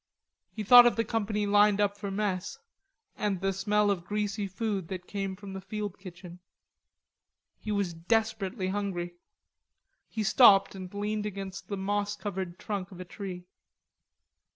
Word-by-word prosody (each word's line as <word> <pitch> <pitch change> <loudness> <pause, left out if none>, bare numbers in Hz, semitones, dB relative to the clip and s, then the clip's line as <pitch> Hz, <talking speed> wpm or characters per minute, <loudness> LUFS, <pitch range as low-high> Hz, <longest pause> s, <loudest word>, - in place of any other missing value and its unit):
He 215 - -5
thought 245 +3 +9
of 240 - +2
the 230 - +1
company 210 -1 -1
lined 205 0 +4
up 205 -1 +2
for 205 0 -5
mess, 195 -2 -2 0.6
and 205 -3 -1
the 195 +1 0
smell 205 +2 +2
of 180 -4 -2
greasy 205 +1 -2
food 195 -2 -3
that 180 0 -6
came 195 -1 -4
from 200 0 -9
the 190 - -6
field 205 0 -5
kitchen. 180 -2 -11 1.2
He 215 - -5
was 200 -4 0
desperately 195 +2 -1
hungry. 190 -3 -3 1.0
He 220 - -2
stopped 200 -2 +6
and 185 -2 -8
leaned 210 +1 -2
against 195 -1 -7
the 200 - -4
moss 205 +1 -1
covered 190 -4 -5
trunk 195 -3 -4
of 185 - -11
a 185 - -6
tree. 180 -1 -7
200 Hz, 150 wpm, -29 LUFS, 190-210 Hz, 1.2 s, thought